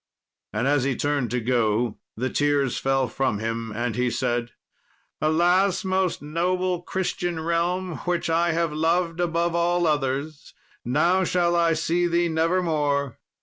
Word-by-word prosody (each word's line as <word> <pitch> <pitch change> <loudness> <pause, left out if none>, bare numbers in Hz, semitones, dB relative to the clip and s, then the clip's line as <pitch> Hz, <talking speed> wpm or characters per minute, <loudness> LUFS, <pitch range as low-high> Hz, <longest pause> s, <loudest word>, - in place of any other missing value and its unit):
And 110 +5 -1
as 145 -2 +2
he 135 -1 0
turned 145 -4 -1
to 125 - -1
go, 115 -1 0 0.2
the 125 +2 -2
tears 145 -3 +1
fell 135 -1 +1
from 130 -5 -1
him, 115 +1 -3
and 115 0 -2
he 125 +1 +1
said, 120 0 -1 0.7
"Alas, 180 +5 +2
most 185 -4 0
noble 180 +3 -1
Christian 175 -2 -2
realm, 170 +2 -1
which 175 -2 0
I 170 +1 +2
have 165 -1 0
loved 165 +2 0
above 170 0 0
all 175 +1 +1
others, 145 0 -2 0.3
now 170 +9 +2
shall 175 -1 +1
I 170 -1 +3
see 175 +2 +1
thee 170 0 +1
never 165 +3 +1
more!" 145 -5 -1
160 Hz, 150 wpm, -24 LUFS, 135-175 Hz, 0.7 s, I